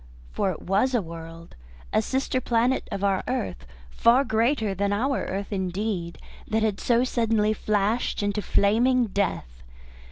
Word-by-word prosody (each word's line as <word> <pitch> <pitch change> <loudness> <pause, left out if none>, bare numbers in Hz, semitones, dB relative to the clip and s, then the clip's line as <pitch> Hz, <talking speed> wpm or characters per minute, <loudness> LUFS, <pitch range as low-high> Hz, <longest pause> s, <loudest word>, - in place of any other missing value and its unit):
For 190 - 0
it 175 - -5
was 210 +8 +1
a 235 - +2
world, 165 0 -10 0.4
a - - +4
sister 260 - -1
planet 240 +2 +1
of 195 - -4
our 195 -2 +1
earth, 90 - -3 0.2
far 240 - +4
greater 225 -2 +1
than 200 +1 -1
our 260 +7 0
earth 200 +2 -4
indeed, 185 -2 -3 0.3
that 220 0 0
had 210 -3 0
so 240 0 +2
suddenly 225 -4 +1
flashed 215 +2 0
into 205 +1 -1
flaming 235 +6 +3
death. 190 - -3
210 Hz, 150 wpm, -25 LUFS, 190-235 Hz, 0.4 s, a